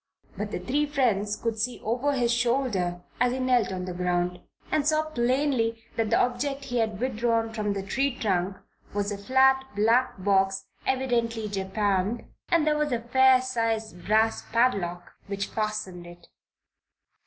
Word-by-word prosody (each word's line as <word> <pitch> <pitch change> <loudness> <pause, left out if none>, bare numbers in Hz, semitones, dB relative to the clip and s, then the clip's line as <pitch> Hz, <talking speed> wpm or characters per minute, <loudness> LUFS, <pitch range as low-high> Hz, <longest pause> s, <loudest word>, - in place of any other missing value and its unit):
But 210 0 -4
the - - -3
three 285 +11 0
friends 220 -8 +1
could 225 -1 -3
see 245 +3 -1
over 250 +6 0
his 240 -3 +1
shoulder 235 -8 0 0.2
as 250 0 +3
he - - -2
knelt 250 -6 +2
on 185 -1 -4
the 180 - -5
ground, 180 0 -1 0.3
and 305 - +2
saw 310 0 +3
plainly 240 -3 +1
that 225 -2 0
the - - +3
object 270 +3 0
he 245 -3 -1
had 220 -3 -1
withdrawn 230 -2 0
from 210 -2 -1
the 195 -1 -4
tree 265 +6 -1
trunk 190 -3 0 0.4
was 205 0 0
a 205 - -3
flat 265 +4 +4
black 230 +5 +3
box, 195 0 +1 0.2
evidently 235 -4 0
japanned, 200 +2 -1 0.3
and 335 -3 +3
there 300 -1 +2
was 300 -1 0
a 240 - +1
fair 255 +2 +4
sized 225 -7 -2
brass 220 +2 +3
padlock 195 -7 +1 0.2
which 200 0 -2
fastened 215 -5 -3
it. 175 0 -14
225 Hz, 160 wpm, -27 LUFS, 200-255 Hz, 0.4 s, flat